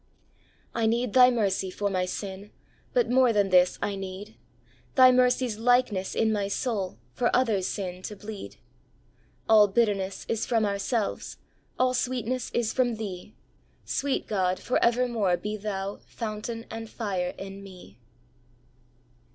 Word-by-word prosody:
" - - -33 0.3
I 230 -1 +1
need 235 0 0
Thy 250 -1 +8
mercy 200 -5 0
for 205 +2 -2
my 185 -2 0
sin; 195 +2 -6 0.4
But - - +2
more 255 -1 +5
than 205 -3 +2
this 180 -1 +4
I 200 - -1
need 195 +2 -7 0.3
— - - -33
Thy 255 -1 +8
mercy's 250 -3 +2
likeness 230 -5 +2
in 220 -1 +2
my 205 -2 -1
soul, 200 -3 -2 0.2
For 240 - +1
others' 220 -7 +2
sin 185 -2 -4
to 210 - -8
bleed. 210 0 -8 0.5
" - - -36
All 215 -2 +7
bitterness 195 -2 0
is 225 -1 -1
from 225 -3 +2
ourselves, 205 +2 -2 0.4
All 255 0 +2
sweetness 255 -1 -2
is 235 -2 0
from 245 -3 +1
Thee; 205 -2 -7 0.5
Sweet 275 -1 -1
God, 185 -3 0
for 250 - 0
evermore 235 -6 +2
be 210 +4 -4
Thou 200 -1 -4
Fountain 225 +1 -5
and 225 0 -6
fire 190 -6 -3
in 195 0 -8
me." 180 - -13
210 Hz, 150 wpm, -27 LUFS, 195-240 Hz, 0.5 s, Thy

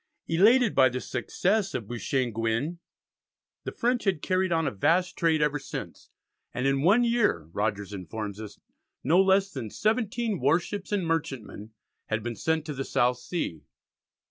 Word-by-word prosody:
Elated 215 +7 +4
by 130 - +5
the 125 +1 -3
success 195 +8 -1
of 110 - -4
Beauchesne 120 +2 -1
Gouin, 115 +9 -1 0.9
the - - -3
French 245 0 0
had 190 -7 0
carried 185 -1 +1
on 165 -1 +1
a 140 - 0
vast 180 - +1
trade 160 -2 +2
ever 150 0 0
since, 135 - -8 0.5
and 125 - -1
in 135 0 +2
one 200 +10 +5
year, 235 - +2
Rogers 105 -1 -2
informs 100 +3 -6
us, 105 -2 -9 0.5
no 165 +8 +5
less 195 0 +3
than 130 -9 -5
seventeen 220 - -1
warships 175 +9 0
and 200 -4 0
merchantmen 135 -9 -3 0.3
had 110 -1 -2
been 120 0 -4
sent 160 +8 -1
to 150 - -4
the 135 -1 -3
South 125 -1 +1
Sea. 120 - -4
155 Hz, 160 wpm, -27 LUFS, 115-190 Hz, 0.9 s, by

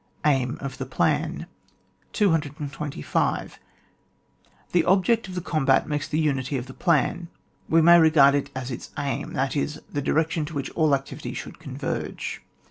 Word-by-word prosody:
Aim 130 -4 +2
of 135 0 -6
the 130 - -4
Plan. 135 - 0 0.7
225. 150 - -1 1.1
The 175 -2 +3
object 195 +4 +3
of 185 - -8
the 180 - -2
combat 145 -5 +2
makes 150 -1 -2
the 155 - -2
unity 140 -3 0
of 125 - -4
the 130 - -10
plan: 170 +3 +1 0.4
we 165 0 +5
may 170 +1 +8
regard 155 -4 +6
it 140 0 0
as 130 0 -4
its 120 - -7
aim, 140 -1 -3
that 135 +2 -1
is, 150 +1 -2
the 145 - -1
direction 160 +2 +1
to 160 +1 -8
which 140 -1 -3
all 155 -4 +3
activities 135 0 -6
should - - -8
converge. - - -4
145 Hz, 155 wpm, -25 LUFS, 135-160 Hz, 1.1 s, may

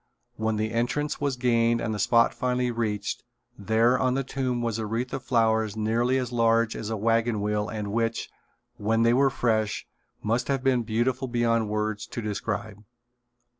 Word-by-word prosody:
When 110 -1 -1
entrance 120 +8 -1
was 140 -2 0
gained 115 -2 +2
and 110 -2 -2
the 105 - -4
spot 115 +4 +4
finally 125 -1 0
reached, 105 -3 -2 0.3
there 115 +5 +2
on 130 0 +1
the 135 - 0
tomb 130 -2 -2
was 115 -1 -1
a 110 - -3
wreath 115 +3 -3
of 135 - -3
flowers 110 -4 +1
nearly 115 +4 +1
as 125 -2 -2
large 115 -1 +2
as 110 - -5
a 110 - -2
wagon 115 +1 +1
wheel 105 0 -1
and 105 -1 -4
which, 115 0 -1 0.5
when 115 +2 +1
they 115 0 +4
were 135 +2 +4
fresh, 110 -5 0 0.4
must 115 +4 0
have 135 -2 -1
been 130 -2 +3
beautiful 120 +4 -1
beyond 115 -2 +1
words 105 0 -2
to - - -6
described. 105 -1 -4
115 Hz, 170 wpm, -26 LUFS, 110-125 Hz, 0.5 s, spot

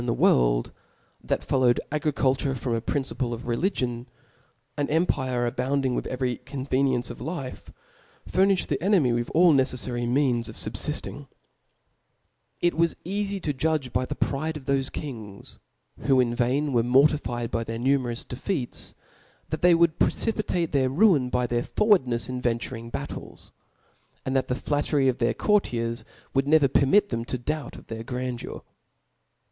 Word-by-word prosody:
^*t^^" - - -5
in - - -4
the 115 - +1
world, - - +3 0.5
that - - -1
followed 125 -3 +3
agrkukurefrom 135 -4 0
a 115 - -1
principle 130 -2 -2
of 115 - -10
religion; 120 -3 -1 0.7
an 145 -1 -1
empire 130 -6 +1
abounding 130 +2 0
with - - -2
every 125 -1 -2
conveniency 130 -1 -1
of - - -14
life, 140 -2 -6 0.6
furniihed 190 +1 +2
the 140 -1 -2
enemy 175 - +3
with 120 0 -1
all 170 0 +6
necefTary 125 -2 0
means 125 -3 +1
of - - -9
fubfiftingl - - -4 1.3
It 175 0 +3
was 170 +1 +1
eafy 200 +1 -2
to 150 - 0
judges 145 -2 -1
by 130 - +1
the 145 - -4
pride 155 +4 -1
of 145 - -11
thoTe 135 -1 +1
kmgs^ 110 -9 -8 0.4
who 135 -2 +3
in 120 -2 +2
vain 130 +4 0
were 120 - +4
mortifkd 125 -1 +2
by 115 - -1
their 115 0 -5
numerous 125 -1 0
de - - -7
feats, 140 -5 -3 0.5
that 155 - -3
they 175 -1 +6
would 170 -1 +3
precipitate 195 -7 0
their 135 -2 +2
ruin 145 -4 +4
by 125 0 +1
their. 120 0 0
forwardnefs 130 - +2
in 125 -1 -4
venturing 115 -1 -2
battles; - - -7 0.7
and 130 - -1
that 135 - +1
the 125 - 0
flat^ 145 +2 -1
tery 140 -3 +3
of 125 - -12
their 115 -1 +1
courtiers 120 - 0 0.3
would 135 0 +1
never 150 -2 +5
permit 145 +10 +3
tfactn 115 0 -2
ta 130 - -2
doubt 150 +4 -4
of - - -12
their 115 0 -6
grandeur. 125 0 -5
130 Hz, 160 wpm, -26 LUFS, 120-150 Hz, 1.3 s, all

